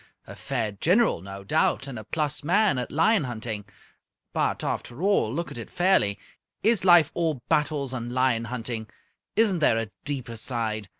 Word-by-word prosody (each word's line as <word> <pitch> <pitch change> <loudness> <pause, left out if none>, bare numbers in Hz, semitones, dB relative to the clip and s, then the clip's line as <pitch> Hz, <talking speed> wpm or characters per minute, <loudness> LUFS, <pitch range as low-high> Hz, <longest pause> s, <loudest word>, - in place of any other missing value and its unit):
A - - -10
fair 120 -6 -2
general, 175 - +2
no 100 +1 -8
doubt, 155 - +1
and 125 -5 -6
a - - -8
plus 150 +5 -2
man 190 -1 +3
at 125 - -4
lion 165 +3 +3
hunting. 110 -4 -4 0.7
But, - - 0
after 125 +8 -4
all 200 - +2
look 170 +6 -3
at - - -7
it 115 - -8
fairly 175 - +2 0.5
is 220 -2 +3
life 175 -4 +6
all 160 -7 -1
battles 145 -3 0
and 120 -1 -4
lion 125 -2 +1
hunting? 115 -2 -5 0.5
Isn't 210 -5 +3
there 120 -7 +3
a 115 -2 -3
deeper 130 -5 -4
side? 110 -4 -2
130 Hz, 170 wpm, -26 LUFS, 115-170 Hz, 0.7 s, life